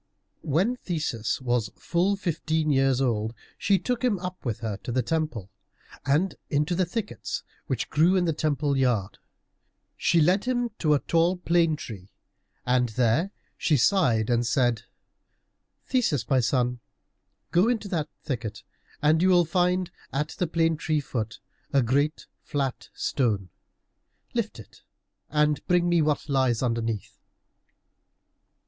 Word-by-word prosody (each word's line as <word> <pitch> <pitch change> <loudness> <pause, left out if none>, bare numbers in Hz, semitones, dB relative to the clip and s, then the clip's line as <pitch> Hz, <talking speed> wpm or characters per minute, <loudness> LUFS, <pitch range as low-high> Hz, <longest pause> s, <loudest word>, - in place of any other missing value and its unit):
When 185 - +1
Theseus 155 - -2
was 120 -4 0
full 180 +4 +1
fifteen 160 -4 -1
years 135 -1 +3
old, 115 -3 0 0.2
she 200 -1 +2
took 245 +4 -2
him 240 -5 +2
up 180 0 -6
with 115 -5 -3
her 110 -4 -3
to 120 - -6
the 125 +1 +1
temple, 150 - -2 0.6
and 160 +7 +2 0.2
into 150 +4 +1
the 180 0 +1
thickets 210 +3 -4 0.2
which 130 -6 -1
grew 165 +5 +4
in 180 -2 +2
the 165 - +1
temple 145 -2 0
yard. 120 -8 0 0.8
She 170 - +2
led 180 +7 +3
him 245 -2 0
to 150 -3 +3
a - - +1
tall 170 +2 +2
plane 170 -2 +2
tree, 100 -9 -9 0.6
and 125 -1 +2
there 125 - +2 0.3
she 150 - +3
sighed 120 - +3
and 120 0 +3
said, 120 -2 +1 1.0
"Theseus, 160 - +1
my 130 0 +3
son, 125 0 +1 0.7
go 180 +5 +4
into 225 -4 -1
that 155 -4 -1
thicket 115 -7 -4 0.4
and 155 +2 +4
you 185 - +4
will 175 -2 +5
find 180 +1 +1 0.2
at 150 +3 -1
the 180 - -2
plane 165 0 +1
tree 155 0 0
foot 115 -5 -4 0.3
a 135 -2 +3
great 140 +6 +1 0.2
flat 135 -3 -3
stone. 105 -8 0 0.8
Lift - - -2
it, - - -14 0.5
and 150 0 +2
bring 175 -1 +3
me 175 -1 +3
what 150 -2 0
lies 130 -4 +1
underneath." 115 -3 -2
150 Hz, 140 wpm, -26 LUFS, 125-175 Hz, 1.0 s, will